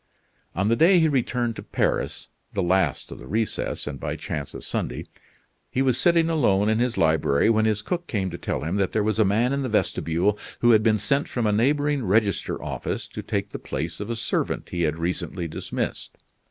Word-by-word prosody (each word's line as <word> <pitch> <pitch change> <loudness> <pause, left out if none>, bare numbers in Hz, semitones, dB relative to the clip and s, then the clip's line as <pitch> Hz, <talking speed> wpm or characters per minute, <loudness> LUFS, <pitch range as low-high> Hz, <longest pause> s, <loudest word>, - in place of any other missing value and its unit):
On 95 +4 +1
the 115 - +3
day 175 +6 +6
he 160 - +4
returned 125 -4 0
to - - -5
Paris - - -1 0.2
the 100 - 0
last 95 +1 +1
of - - -8
the 60 - -11
recess, 110 +1 -1
and 70 -2 -5
by - - -3
chance 70 -2 -5
a - - -6
Sunday - - -3 0.6
he 130 - 0
was 130 -3 +3
sitting 165 +4 +3
alone 110 -11 +2
in 110 +1 +2
his 120 -1 0
library 80 +3 +3
when 110 -1 +3
his 110 -1 0
cook 175 -1 -3
came 95 -4 -1
to 85 - -5
tell - - -2
him 80 +7 -2
that 95 -3 0
there 110 - +2
was 110 +1 0
a - - +6
man 110 +6 +2
in 140 - 0
the 130 - -2
vestibule 100 -1 +1 0.2
who 120 - +6
had 110 -2 +6
been 110 -1 +3
sent 140 +8 0
from 120 -2 -2
a 105 - +3
neighboring 145 +5 +2
register 105 0 +1
office - - -3
to - - -6
take - - -3
the - - -6
place 80 +4 -4
of 105 +2 -5
a 115 - -1
servant 110 0 -2
he 85 - -3
had 80 -1 +1
recently 85 +1 -2
dismissed. 75 - -4
110 Hz, 215 wpm, -24 LUFS, 95-125 Hz, 0.6 s, day